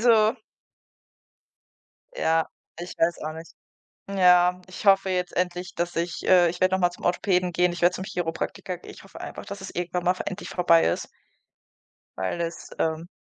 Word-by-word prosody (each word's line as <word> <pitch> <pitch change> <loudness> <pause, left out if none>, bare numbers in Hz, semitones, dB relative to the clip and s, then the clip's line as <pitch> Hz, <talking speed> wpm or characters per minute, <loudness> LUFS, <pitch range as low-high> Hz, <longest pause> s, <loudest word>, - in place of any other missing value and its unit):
Also 225 -1 +5 1.8
ja, 160 0 +2 0.3
ich 175 +1 -6
weiß 170 +1 +2
auch 155 - -3
nicht. 160 +1 -10 0.6
Ja, 180 -2 +4
ich 185 +3 -9
hoffe 195 -1 +5
jetzt 180 -1 -1
endlich, 180 0 -2
dass 175 +1 -2
ich 170 -1 -2
äh, 180 -2 +6
ich 175 +1 -7
werde 185 0 +4
noch - - -1
mal 175 -1 +3
zum 175 - -10
Orthopäden 180 0 +1
gehen, 180 0 +2
ich 175 - -7
werde 175 +1 +4
zum 185 - -5
Chiropraktiker 175 +1 -4
gehen. 180 - -12
Ich - - -14
hoffe 195 - -13
einfach, - - -7
dass 200 0 -7
es 190 - -7
irgendwann 175 0 -3
mal 180 - +3
v 185 - -6
endlich 195 +1 -5
vorbei 170 -2 +4
ist - - -2 1.1
weil 95 - -2
es, 170 0 -4
ähm 160 +1 -1
180 Hz, 180 wpm, -25 LUFS, 170-185 Hz, 1.8 s, äh